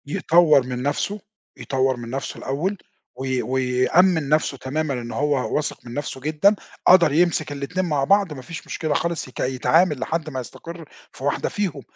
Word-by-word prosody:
يطوّر 155 -1 +4
من 125 0 -4
نَفْسه، 145 +9 -1 0.4
يطوّر 130 -1 0
من 120 -1 -7
نَفْسه 135 +3 -4
الأول 165 +10 -2 0.4
وي 130 0 -2
ويأمِّن 130 +6 +2
نَفْسه 150 -2 +1
تمامًا 145 +3 -2
إنه 120 -2 -5
هو 145 0 0
واثق 150 -3 -3
من 120 - -8
نَفْسه 140 -1 -5
جدًا، 155 +8 +3 0.3
قدر 175 -4 +7
يمسك 160 -2 +2
الاتنين 145 +7 -3
مع 150 -5 0
بعض 195 +2 +3
ما 135 - -8
فيش 165 +6 -9
مشكلة 155 -2 -2
خالص 170 +1 -1
يك 130 - -12
يتعامل 150 +4 +2
لحد 155 +4 -2
ما 130 -3 -4
يستقر 165 +6 -9 0.3
في - - -12
واحدة 145 - 0
فيهم، 180 -9 -3
145 Hz, 170 wpm, -22 LUFS, 130-165 Hz, 0.4 s, قدر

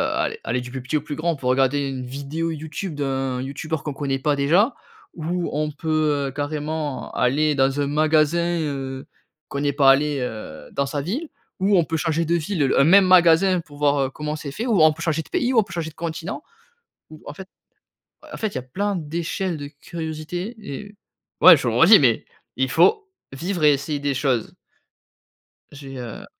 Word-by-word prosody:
aller - - -2
aller 125 +2 -1
du 125 0 -9
plus 130 0 -5
petit 135 +5 -1
au - - -3
plus 145 0 -6
grand, 165 +1 -1
pour 125 -2 -2
regarder 135 +2 +2
une 130 -1 -5
vidéo 140 +6 -4
YouTube 160 +2 -5
d'un 135 -2 -2
youtubeur 145 +3 -4
qu'on 150 - -4
connaît 135 -1 -2
pas 145 +2 +1
déjà 175 - +3 0.4
ou 170 +2 -3
on 150 +1 -1
peut, 150 -2 0
heu, - - -8
carrément 150 0 -3
aller 150 +4 +2
dans 135 +1 +1
un 140 - 0
magasin, 155 +3 +2
heu, 135 -3 -4 0.4
qu'on 140 - -4
n'est 145 0 +1
pas 135 -1 +6
allé, 145 +1 +2
heu, 110 -11 -6
dans 140 - 0
sa 145 +1 -3
ville 245 - -4 0.3
ou 195 +1 +3
on 170 - +3
peut 165 - -3
changer 165 0 0
de 170 +2 +1
ville, 160 -4 0
un - - +6
même 190 +4 +7
magasin 180 0 +5
pour 145 -3 -15
voir, 145 -1 +2
heu, - - -8
comment 150 +2 -4
c'est 150 -2 -6
fait, 220 - -4
ou 210 -9 +3
on 155 - +7
peut 165 - -11
changer 160 -2 0
de - - -15
pays, 250 +1 0
ou 230 - +5
on - - +3
peut 195 - -15
changer 165 -2 -4
de - - -28
continent, 170 - -5 0.7
ou 155 - -13
en 145 - -7
fait 190 +4 -11 0.8
en - - -5
fait, 220 - -1
il - - -15
y - - -1
a - - -7
plein 200 +11 -2
d'échelles 170 +2 -3
de 145 -1 -6
curiosité 160 +7 -6
et 205 +4 -8 0.5
ouais, - - +10
je - - -3
le - - 0
redis, - - +8
mais - - +3 0.3
il - - +1
faut 425 -2 +3 0.3
vivre 175 +4 -3
et 150 - +7
essayer 145 +2 -2
des 145 0 -1
choses. 130 -4 -1 1.2
J'ai 135 -1 -10
heu 120 -3 -8
150 Hz, 205 wpm, -22 LUFS, 140-170 Hz, 1.2 s, ouais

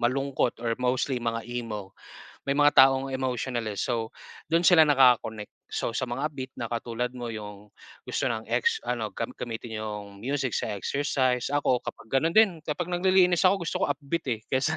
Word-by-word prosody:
malungkot 130 +1 0
or 115 - +1
mostly 125 +1 0
mga 115 -1 -2
emo. 110 -5 -5 0.5
May 140 - +2
mga 145 0 +5
taong 135 0 +6
emotional, 130 -2 -2
eh, 105 - -3
so 115 -2 -2 0.4
do'n 165 - +5
sila 175 -2 +7
nakaka-connect. 125 -6 +3 0.2
So, - - -1
sa - - 0
mga 130 +5 -2
upbeat 130 -3 -7
na 115 - -5
katulad 120 +1 -2
mo 120 -1 -5
'yung 105 -1 -9 0.3
gusto - - -1
ng 110 -1 -3
ex 465 -1 +1
ano, - - -1
gam - - -4
gamitin 115 -1 -6
'yung 105 -2 -7
music 135 -1 -1
sa - - -1
exercise. 130 +1 0
Ako 140 -4 +2
kapag - - -8
gano'n 160 +5 +2
din, 200 -7 +5
kapag 155 +3 -3
naglilinis 180 -1 +4
ako 185 -1 +3
gusto - - -2
ko - - +3
upbeat, 145 +3 -2
eh, 115 -3 -2
kaysa 135 +4 +1
130 Hz, 180 wpm, -27 LUFS, 115-145 Hz, 0.5 s, sila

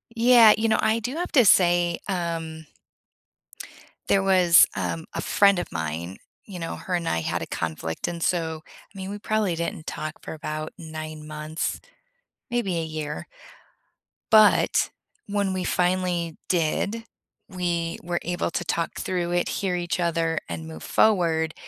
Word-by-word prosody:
Yeah, 230 -2 +7
you 225 +1 +1
know, - - +3
I 220 +1 +2
do 245 +6 -4
have 350 +2 -3
to 250 -5 +6
say, 175 -2 +4
um 165 -4 -3 1.4
there 195 - +3
was, 180 -3 +6
um, 165 -1 -3
a - - -3
friend 200 -2 +4
of - - -5
mine, 80 +3 -4 0.3
you 185 -4 -8
know, 165 - -4
her 180 - -3
and 170 -1 -2
I 80 - +1
had - - -2
a - - -5
conflict, 80 0 -3
and 170 -1 -5
so, 160 -3 -1 0.3
I - - -14
mean, 190 0 -5
we 205 - -5
probably 210 -4 0
didn't 165 -1 -4
talk 155 -1 -4
for - - -7
about 155 0 -5
9 155 -2 -7
months, 155 +1 -4 0.7
maybe 215 -8 -1
a 165 - -2
year 155 -1 -5 1.1
but 215 -1 +5 0.4
when 200 -1 0
we 185 -1 -2
finally 180 -2 0
did, 195 +7 0 0.4
we 175 -3 -2
were 175 0 -2
able 175 -1 -2
to - - -2
talk 165 0 -2
through 175 -2 -2
it, 175 0 +1
hear 190 -2 -1
each 175 0 -2
other, 165 -2 0
and 80 -1 -5
move 80 -1 -9
forward, 165 -7 +2
175 Hz, 160 wpm, -25 LUFS, 160-195 Hz, 1.4 s, Yeah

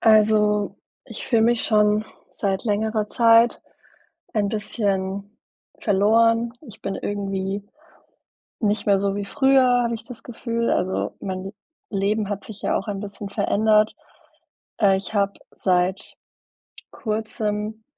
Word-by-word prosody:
Also, 210 -1 +4 0.3
ich - - -8
fühle 230 -3 +3
mich 235 0 +3
schon 210 -1 +3 0.3
seit 195 0 -2
längerer 215 0 0
Zeit 230 0 +4 0.7
ein 205 -2 +1
bisschen 200 -2 -2 0.4
verloren. 230 +3 +3
Ich 230 -9 -13
bin 195 - -3
irgendwie 195 0 -3 1.0
nicht 210 -1 0
mehr 200 -1 +4
so 200 0 0
wie 205 - -2
früher, 270 0 +4 0.2
habe 235 0 -1
ich 225 - -8
das 245 -3 -11
Gefühl. 235 -1 -2
Also, 185 +1 -1
mein 190 0 -5 0.4
Leben 205 +1 0
hat 205 -1 -4
sich 215 -2 -11
ja - - +1
auch 195 - -4
ein 200 -1 -3
bisschen 200 0 -7
verändert. 215 +1 +2 0.9
Äh, 195 -3 +5
ich 195 +3 -6
habe 200 -1 +2 0.3
seit 185 +1 0 0.8
Kurzem 215 -1 -3
210 Hz, 125 wpm, -23 LUFS, 200-225 Hz, 1.0 s, Äh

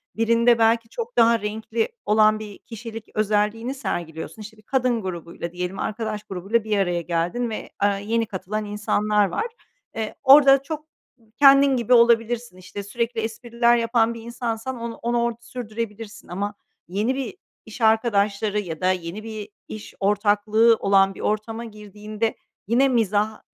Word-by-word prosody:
Birinde 230 +1 +3
belki 225 0 +3
çok 470 +1 -6
daha 230 0 +5
renkli 220 +2 -2 0.2
olan 215 0 +4
bir 210 -2 -9
kişilik 225 -1 -9
özelliğini 215 +4 0
sergiliyorsun. 170 - -5
İşte, 215 +1 -10
bir - - -18
kadın 250 -1 0
grubuyla 170 -2 -6
diyelim 180 +2 -4
arkadaş 215 -1 -3
grubuyla 195 +5 -1
bir 215 -1 0
araya 175 -3 0
geldin 175 +8 -1
ve, 220 - -6
eee, 200 -1 +2
yeni 230 +1 +1
katılan 210 +1 -4
insanlar 210 0 +1
var. 440 - -2 0.5
Eee, 220 -1 -4
orada 275 0 +7
çok 310 +2 -6 0.5
kendin 275 -1 +7
gibi 240 +1 +2
olabilirsin. 235 -2 +3
İşte, 190 +2 -8
sürekli 230 +3 -2
espriler 235 +1 +1
yapan 230 0 +2
bir 230 - -9
insansan 235 +1 -4
on 235 0 -4
onu 240 0 0
orada 235 -1 -1
sürdürebilirsin 230 -2 -7
ama 200 +3 -3 0.3
yeni 210 +8 -1
bir 255 -7 -4 0.3
iş 220 +2 -10
arkadaşları 210 -2 +2
ya 165 -5 -6
da 185 - +3
yeni 185 +3 -5
bir 215 -2 -7 0.2
iş 215 -1 -9
ortaklığı 210 +3 +3
olan 195 -1 +3
bir - - -12
ortama 225 +2 -2
girdiğinde 210 +1 -5 0.3
yine 245 +5 +4
mizahi 215 -3 +1
220 Hz, 150 wpm, -23 LUFS, 205-235 Hz, 0.5 s, orada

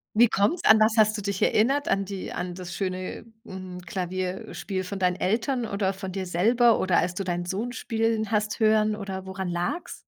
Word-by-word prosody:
Wie 235 +1 +6
kommt's? 210 - +1
An 220 0 +7
was 215 +1 +4
hast 215 0 +5
du 205 - -5
dich 200 -1 -3
erinnert? 275 +7 +2
An 195 - +1
die 195 -1 -6
an 180 0 -4
das 175 -2 -7
schöne 185 +2 -4 0.2
hm, 185 -3 -8
Klavier 185 +3 -3
äh, - - -9
Spiel 190 -2 -3
von 190 +2 -5
deinen 180 -1 +2
Eltern 230 +7 0
oder 200 -2 -1
von 190 -1 -6
dir 190 0 -4
selber 230 +7 +3
oder 185 -2 +2
als 180 - 0
du 195 - -3
deinen 175 -1 -2
Sohn 200 +7 -3
spielen 225 -2 -1
hast 210 0 0
hören 215 -1 +3
oder 190 -2 -6
woran 190 -1 -5
lag's? 175 - -3
195 Hz, 210 wpm, -26 LUFS, 185-220 Hz, 0.2 s, An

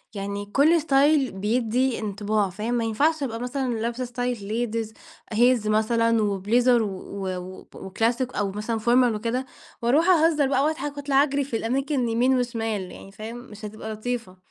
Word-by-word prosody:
يعني 200 0 -4
كل 295 +10 +3
ستايل 285 -1 +3
بيدِّي 230 +5 0
انطباع، 210 -1 -1
فاهم؟ 215 +6 -3
ما 240 -1 +1
ينفعش 290 +8 +1
أبقى 230 -4 -3
مثلًا 250 +1 -2
لابسة 235 +3 -2
ستايل 245 0 -2 0.4
ladies 225 -1 -2 0.5
heels 240 -1 +3
مثلًا، 230 +1 +2
وبليزر 225 +5 +2
و - - -1
و 190 -1 -5
وب 185 +1 -10
وكلاسيك، 230 +6 -1
أو 200 -1 -1
مثلًا 215 +3 -3
formal 240 +1 +3
وكده، 235 +4 -2 0.4
وأروح 265 +8 +3
أهزر 320 -5 +4
بقى 270 0 +2
وأضحك، 290 -1 -2
وأطلع 280 -1 +3
أجري 285 -1 0
في 260 -4 -3
الأماكن 260 +2 -1
يمين 250 +3 +2
وشمال، 225 -6 -2
يعني 195 - -12
فاهم؟ 220 +3 -8
مش 220 -3 -10
هتبقى 215 +1 -6
لطيفة. 215 -4 -4
235 Hz, 160 wpm, -24 LUFS, 215-260 Hz, 0.5 s, أهزر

